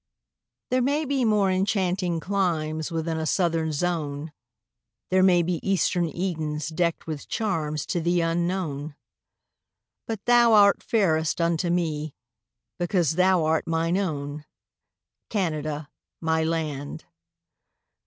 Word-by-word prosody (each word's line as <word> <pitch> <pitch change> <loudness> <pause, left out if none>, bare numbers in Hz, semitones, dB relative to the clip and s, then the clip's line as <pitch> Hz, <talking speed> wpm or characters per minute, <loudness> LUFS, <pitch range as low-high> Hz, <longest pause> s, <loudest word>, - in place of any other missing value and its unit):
There 255 0 +3
may 285 +5 +1
be 275 -2 0
more 210 -4 +3
enchanting 185 -2 0
climes 160 -5 -1
Within 165 0 -2
a 160 - -2
southern 165 -2 +1
zone; 150 -2 -2 0.8
There 185 0 +4
may 180 -2 +5
be 170 -1 -1
eastern 180 -2 +1
Edens 155 -4 -3
deckt 170 +1 -1
With 155 -3 -6
charms 155 -9 -2
to 175 - -1
thee 175 +2 +1
unknown; 165 -3 -1 1.1
But 220 -3 -5
thou 240 -1 +5
art 205 -1 +6
fairest 160 -9 +1
unto 170 +1 +1
me, 155 -4 -1 0.6
Because 175 -3 +1
thou 180 0 +3
art 160 0 +1
mine 165 +1 0
own, 150 -6 -3 0.8
Canada, 155 -7 -2 0.3
my 160 -1 +1
land. 155 -4 -3
170 Hz, 115 wpm, -25 LUFS, 155-190 Hz, 1.1 s, art